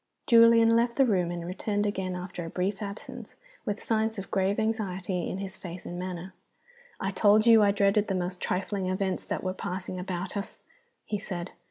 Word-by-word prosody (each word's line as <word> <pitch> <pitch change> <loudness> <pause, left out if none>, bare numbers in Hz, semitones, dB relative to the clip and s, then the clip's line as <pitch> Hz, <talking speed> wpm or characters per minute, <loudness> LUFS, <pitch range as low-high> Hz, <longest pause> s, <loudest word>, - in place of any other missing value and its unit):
Julian 230 -1 +7
left 235 0 +2
the 270 - +6
room, 185 -7 +1
and 175 -1 -4
returned 205 +3 -1
again, 190 -3 -2
after 180 -1 -5
a 165 - -5
brief 190 +4 -2
absence, 200 0 -7 0.3
with 205 -3 -2
signs 220 -1 0
of 195 - -7
grave 195 0 +1
anxiety 195 -5 -1
in - - -3
his 195 -1 -5
face 175 -1 -8
and 175 - -5
manner. 185 0 -5 0.7
"I 195 - -1
told 210 +3 +4
you 230 -2 +8
I 205 - +5
dreaded 200 +1 +3
the 195 - -1
most 180 0 -3
trifling 190 +1 -1
events 185 0 -1
that - - -3
were 185 0 -1
passing 185 0 -5
about 180 +1 -4
us," 200 0 -5 0.4
he 210 - -2
said. 180 -3 -5
195 Hz, 190 wpm, -28 LUFS, 185-210 Hz, 0.7 s, you